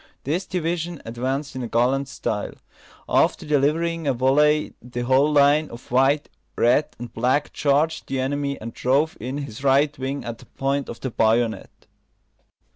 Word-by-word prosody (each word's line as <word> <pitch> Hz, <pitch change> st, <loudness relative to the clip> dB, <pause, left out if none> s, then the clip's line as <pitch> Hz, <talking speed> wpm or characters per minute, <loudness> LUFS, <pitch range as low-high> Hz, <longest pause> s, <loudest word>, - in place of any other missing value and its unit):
This 170 Hz, +7 st, -2 dB
division 170 Hz, -2 st, -2 dB
advanced 130 Hz, +5 st, -3 dB
in 125 Hz, -2 st, -3 dB
gallant 125 Hz, +4 st, +1 dB
style. 105 Hz, -6 st, -3 dB, 0.5 s
After -, -, +2 dB
delivering 155 Hz, +3 st, +1 dB
a 135 Hz, -, +2 dB
volley, 150 Hz, +4 st, +3 dB
the 120 Hz, 0 st, -6 dB
whole 130 Hz, +4 st, +3 dB
line 145 Hz, +1 st, +4 dB
of 115 Hz, 0 st, -12 dB
white, 135 Hz, +4 st, +3 dB, 0.3 s
red, 125 Hz, +6 st, +3 dB
and 120 Hz, 0 st, -8 dB
black 130 Hz, +5 st, 0 dB
charged 150 Hz, +3 st, +1 dB
the 135 Hz, -, -2 dB
enemy, 140 Hz, +1 st, -2 dB
and 115 Hz, +1 st, -7 dB
drove 140 Hz, +5 st, +1 dB
in 130 Hz, +5 st, -4 dB
his 140 Hz, -3 st, -7 dB
right 140 Hz, +2 st, +3 dB
wing 135 Hz, 0 st, -3 dB
at 115 Hz, -1 st, -6 dB
the -, -, -16 dB
point 140 Hz, 0 st, -2 dB
of 115 Hz, -, -8 dB
the 130 Hz, -, -3 dB
bayonet. 110 Hz, -1 st, 0 dB
135 Hz, 155 wpm, -23 LUFS, 125-150 Hz, 0.5 s, line